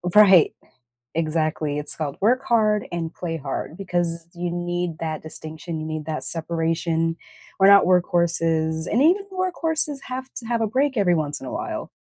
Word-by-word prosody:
Right. 195 -5 +7 0.6
Exactly, 155 -2 -1
it's 150 - -1
called 150 -2 -4
"work 250 +5 +3
hard 215 -3 +2
and 170 -2 -3
play 165 -2 -4
hard," 140 +1 -5
because 175 -3 -2
you 175 0 -3
need 175 -1 -2
that 155 -1 -3
distinction, 160 +1 -7
you 155 - -4
need 155 -1 -4
that 155 -1 -3
separation. 165 0 -1 0.4
We're 195 - +7
not 200 0 +8
workhorses, 165 -3 +1
and 235 +5 +3
even 375 +6 +3
workhorses 330 -6 0
have 260 +1 -6
to 230 - -6
have 235 -1 0
a - - +2
break 265 +4 0
every 185 -4 +3
once 150 -3 -1
in 135 - -9
a - - -6
while. - - -4
170 Hz, 170 wpm, -23 LUFS, 160-210 Hz, 0.6 s, not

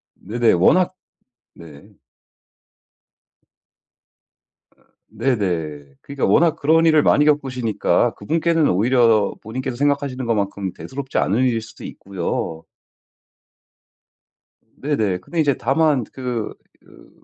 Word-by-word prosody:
네네. 115 +3 0
워낙 175 - +3 0.6
네. 75 -4 -15 2.8
아 - - -33 0.3
네네. 90 - -2
그러니까 140 -1 -3
워낙 165 -2 +3
그런 165 +3 +3
일을 155 -2 +4
많이 150 - +4
겪으시니까 130 -7 +1
그분께는 165 +6 +1
오히려 110 +1 +3
본인께서 125 +3 -5
생각하시는 140 -2 -1
것만큼 100 -4 -2
대수롭지 135 0 -6
않은 105 +5 +1
일일 115 -3 0
수도 115 - -13
있고요. 85 -3 -5 2.2
네네. 110 -11 -1
근데 165 - -5
이제 145 -4 +2
다만 145 -2 +1
그 125 -4 -4 0.3
그 - - -19
125 Hz, 235 characters per minute, -20 LUFS, 100-145 Hz, 2.8 s, 일을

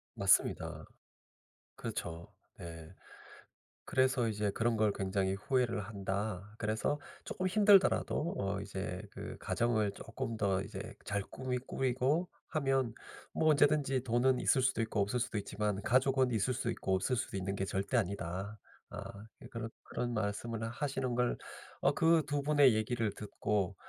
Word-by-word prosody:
맞습니다. - - +2 0.9
그렇죠. 85 0 -5 0.3
네. 80 -2 -9 0.9
그래서 130 -2 +2
이제 105 -2 0
"그런 115 +3 +1
걸 110 -1 +3
굉장히 95 -1 0
후회를 120 +2 +1
한다. 100 -1 -3
그래서 110 +7 0 0.2
쪼끔 185 - -2
힘들더라도 195 -4 +4
어 100 0 -1
이제 95 -2 -4
그 - - -7
가정을 110 -3 +1
쪼끔 115 +2 -5
더 95 -2 +1
이제 100 -1 -7
잘 100 -1 -1
꾸미 130 +3 -3
꾸리고 130 +6 0 0.2
하면 135 -6 +1 0.4
뭐 155 - +3
언제든지 145 -3 +3
돈은 125 +1 +3
있을 130 - +3
수도 130 -3 +2
있고 110 -1 -1
없을 100 +5 0
수도 115 - -2
있지만 105 0 -2
가족은 130 +2 +3
있을 115 +3 +1
수 125 -1 -2
있고 95 -4 0
없을 95 +7 0
수도 115 -4 -2
있는 95 +1 -2
게 95 - -2
절대 100 +4 -2
아니다." 100 0 -2 0.3
어 - - -8 0.5
그런 115 -1 -4
그런 120 0 -3
말씀을 110 +1 -2
하시는 130 0 -2
걸 125 0 +1 0.4
어 - - +4
그 165 -1 +4
2 145 -1 0
분의 145 -3 +5
얘기를 110 0 0
듣고 100 -2 -1
115 Hz, 290 characters per minute, -33 LUFS, 100-130 Hz, 0.9 s, 분의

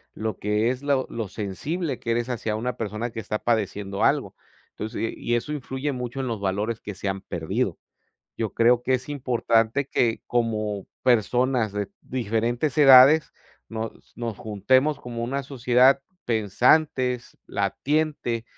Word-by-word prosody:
lo 110 -1 -3
que 105 +3 +1
es 130 - -5
lo 140 -2 +1
lo 115 -3 -3
sensible 135 - -4
que 115 - -6
eres 120 +1 0
hacia 115 -3 -2
una 120 +3 -2
persona 115 +1 -4
que 115 - -6
está 105 0 -3
padeciendo 105 -3 -1
algo. - - +1 0.4
Entonces 110 +2 -6
y 115 - -1
y 120 - -1
eso 150 +6 -2
influye 135 0 -3
mucho 125 0 -4
en 130 - -3
los 115 -4 -3
valores 105 +4 -1
que 105 -2 -7
se 100 - -5
han 95 0 -2
perdido. 85 -4 -2 0.6
Yo 110 -3 -2
creo 120 +1 +4
que 130 - +1
es 130 +2 -3
importante 125 -2 +1
que, 115 -4 +1
como 110 -4 -1 0.2
personas 125 -1 +2
de 105 -1 -3
diferentes 120 +3 -1
edades, 140 +2 +8 0.4
nos 110 0 -4 0.2
nos 115 -4 -4
juntemos 130 +8 +1
como 120 -3 -6
una 135 +3 -2
sociedad 130 0 +4 0.2
pensantes, 125 +3 +1
latiente, 120 +3 -1
120 Hz, 150 wpm, -25 LUFS, 110-130 Hz, 0.6 s, edades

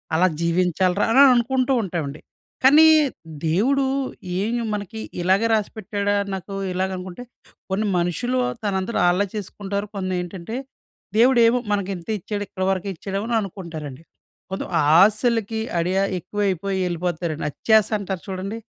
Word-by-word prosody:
అలా 180 +3 +4
జీవించాలిరా" 180 +3 +1
అని 265 +4 +6
అనుకుంటూ 255 +2 +1
ఉంటామండి. 155 -6 -4 0.4
కానీ 295 +5 +8 0.6
దేవుడు 245 - +2 0.6
ఏమి 235 +4 -1
మనకి 210 +1 -5 0.2
ఇలాగే 190 +5 +3
రాసిపెట్టాడా? 205 -1 -1 0.2
నాకు 190 +1 -6 0.2
ఇలాగ 190 +1 -1
అనుకుంటే. 185 +5 -8 0.5
కొన్ని 205 +3 0
మనుషులు 180 +9 -1 0.3
తన 205 - 0
అంతట 210 +5 -3
ఆళ్ళే 180 +3 +3
చేసుకుంటారు. 200 0 -4
కొన్ని 185 -1 -2
ఏంటంటే, 180 +4 -7 0.6
దేవుడేమో 240 0 +5
మనకు 200 -2 0
ఇంతే 175 +5 -5
ఇచ్చాడు 205 +3 -4
ఇక్కడి 185 0 -3
వరకే 190 +1 -2
ఇచ్చాడేమో, 195 +4 -4
అని 235 - +1
అనుకుంటారండి. 165 -7 -7 0.5
కొంతం 190 - -4 0.3
ఆశలకి 220 +2 +2 0.2
అడియా 185 +3 +1 0.2
ఎక్కువైపోయి 195 0 -2
వెళ్ళిపోతారండి. 170 -2 -2
అత్యాస 220 +6 +3
అంటారు 190 -3 -4
చూడండి. 195 +3 -4
195 Hz, 125 wpm, -22 LUFS, 180-220 Hz, 0.6 s, కానీ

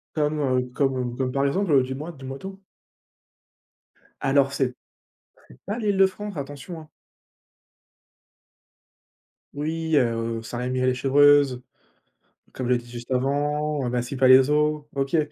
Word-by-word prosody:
Comme, 150 0 0
heu, 130 -2 0
comme 130 -3 -1
comme 130 -1 -1
par 140 +1 0
exemple, 145 -2 +2
dis-moi 135 +6 -6
dis-moi 135 -3 -8
tout. 195 0 -9 1.6
Alors 135 0 +2
c'est 130 -2 -1 0.7
c'est 60 - -17
pas 205 +4 -3
l'Île-de-France, 200 -1 0
attention, 145 +4 -7
hein. 155 - -15 2.6
Oui, 160 +2 -2
heu, 115 -3 0
Saint-Rémy-lès-Chevreuse, 130 +3 +2 0.9
comme 130 -2 -4
je 125 - +3
l'ai - - +3
dit 120 0 -11
juste 120 +1 -9
avant, 145 +1 0
Massy-Palaiseau, 135 +4 +3
heu, - - -3
OK. 135 +4 0
135 Hz, 110 wpm, -24 LUFS, 125-150 Hz, 2.6 s, je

